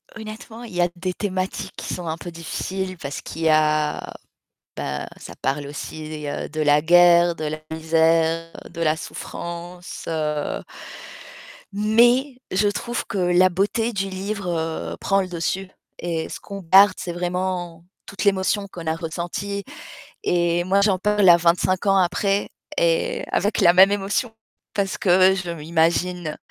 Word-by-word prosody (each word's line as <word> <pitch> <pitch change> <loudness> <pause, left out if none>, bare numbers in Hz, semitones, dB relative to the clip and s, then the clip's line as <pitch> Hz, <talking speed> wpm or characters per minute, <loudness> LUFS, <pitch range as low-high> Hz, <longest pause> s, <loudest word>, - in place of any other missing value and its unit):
Honnêtement, 220 +1 -9
il 230 -5 -10
y 175 - +1
a 175 - +3
des 185 +1 -2
thématiques 185 -1 -3
qui - - -4
sont 175 -2 -5
un 160 0 -2
peu 175 +1 -8
difficiles 185 +3 -4
parce 140 -3 -6
qu'il 165 - -7
y 160 - +4
a 155 -1 +1 0.6
bah, 70 - -4
ça 85 - -10
parle 140 +1 -1
aussi, 155 +1 -7
heu, 145 - -4
de 155 - -3
la 150 0 +4
guerre, 175 +1 +6
de 155 - -6
la 155 +1 -3
misère, 165 +1 +2 0.2
de 170 - -6
la 155 -1 +2
souffrance, 175 +2 -7
heu 150 -2 -2 1.1
mais 240 +6 +3
je 195 +3 +2
trouve 235 +4 -2
que 200 - -5
la 180 0 +4
beauté 210 +6 0
du 195 -1 -2
livre, 195 +1 -4 0.5
heu, - - -8
prend 195 0 +2
le 185 - -3
dessus 180 +2 -2 0.3
et 165 -2 -2
ce - - -7
qu'on 200 0 -8
garde, 190 +3 +7
c'est 175 - -5
vraiment 175 -1 -3 0.2
toute 200 - -5
l'émotion 200 +1 +1
qu'on 170 -3 -8
a 160 - +1
ressentie 175 +5 -4 0.6
et 175 - +1
moi, 195 +2 +3
j'en 200 -2 +3
parle 210 -1 +4
à 170 - +9
25 175 +2 +1
ans 195 -1 +4
après 195 +2 +1 0.3
et - - +1
avec 205 +2 +1
la 175 -3 +7
même 190 +2 +7
émotion 205 +4 -1 0.4
parce 200 -2 -1
que 185 0 +5
je 185 -2 -4
m'imagine 165 +1 0
180 Hz, 160 wpm, -22 LUFS, 165-195 Hz, 1.1 s, à